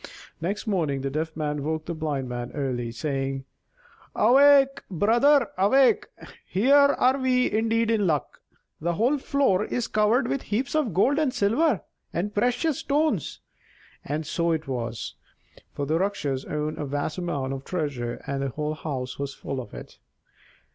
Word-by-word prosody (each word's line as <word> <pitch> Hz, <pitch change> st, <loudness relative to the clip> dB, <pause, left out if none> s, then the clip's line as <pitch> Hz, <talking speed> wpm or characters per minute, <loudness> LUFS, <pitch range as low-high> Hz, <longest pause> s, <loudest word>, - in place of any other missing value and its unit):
Next 195 Hz, +8 st, -2 dB
morning 160 Hz, -, 0 dB
the 135 Hz, 0 st, -3 dB
Deaf 160 Hz, +2 st, -3 dB
Man 150 Hz, -2 st, -2 dB
woke 155 Hz, +1 st, -2 dB
the 170 Hz, -, -3 dB
Blind 150 Hz, -5 st, -3 dB
Man 120 Hz, 0 st, -5 dB
early, 125 Hz, -5 st, -2 dB
saying: 135 Hz, +1 st, -3 dB, 0.7 s
"Awake, 275 Hz, +3 st, +5 dB
brother, 235 Hz, -, +3 dB
awake: 255 Hz, +7 st, +4 dB, 0.4 s
here 280 Hz, +8 st, +4 dB, 0.3 s
we 255 Hz, -1 st, +3 dB
are -, -, -1 dB
indeed 225 Hz, 0 st, +1 dB
in 210 Hz, -4 st, +2 dB
luck! 150 Hz, -4 st, -2 dB, 0.4 s
The 170 Hz, +1 st, -1 dB
whole 255 Hz, -, +2 dB
floor 265 Hz, -9 st, +2 dB
is 240 Hz, +1 st, -2 dB
covered 220 Hz, +4 st, +2 dB
with 275 Hz, -, -1 dB
heaps 240 Hz, +6 st, -2 dB
of 310 Hz, -7 st, +1 dB
gold 270 Hz, +10 st, +3 dB
and 300 Hz, -4 st, +1 dB
silver 245 Hz, -, +2 dB, 0.3 s
and 205 Hz, +5 st, -2 dB
precious 245 Hz, +8 st, +1 dB
stones." 285 Hz, -, 0 dB, 0.6 s
And 150 Hz, +2 st, -3 dB
so 170 Hz, +2 st, 0 dB
it 160 Hz, -2 st, -2 dB
was, 120 Hz, -3 st, -4 dB, 0.6 s
for 145 Hz, -, -3 dB
the 160 Hz, +3 st, +1 dB
Rakshas 150 Hz, -9 st, -1 dB
owned 150 Hz, 0 st, -3 dB
a 150 Hz, -, -2 dB
vast 145 Hz, +5 st, -3 dB
amount 140 Hz, -7 st, -2 dB
of 135 Hz, 0 st, -6 dB
treasure, 140 Hz, -9 st, -3 dB
and 140 Hz, 0 st, -3 dB
the 135 Hz, -, -1 dB
whole 150 Hz, +3 st, -3 dB
house 130 Hz, -5 st, -5 dB
was 140 Hz, -1 st, -4 dB
full 135 Hz, -1 st, -4 dB
of 110 Hz, -, -12 dB
it. -, -, -11 dB
170 Hz, 160 wpm, -25 LUFS, -, 0.7 s, Awake